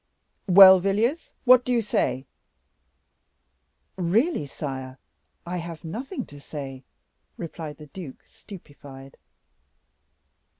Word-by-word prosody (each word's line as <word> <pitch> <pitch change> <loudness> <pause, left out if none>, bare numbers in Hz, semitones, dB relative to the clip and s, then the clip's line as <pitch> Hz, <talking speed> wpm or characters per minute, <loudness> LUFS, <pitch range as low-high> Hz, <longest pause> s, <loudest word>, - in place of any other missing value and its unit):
"Well, 190 0 +9
Villiers, 215 - -1
what 250 0 +7
do 250 - -3
you 235 -2 +1
say?" 135 -9 -1 1.7
"Really, 190 - 0
sire, 130 -2 -7 0.5
I 180 +1 -4
have 170 -2 -7
nothing 240 - -6
to 145 - -14
say," 135 -3 -8 0.6
replied 160 -3 -7
the 150 - -12
duke, 150 -1 -11
stupefied. 140 -8 -14
170 Hz, 95 wpm, -25 LUFS, 140-205 Hz, 1.7 s, Well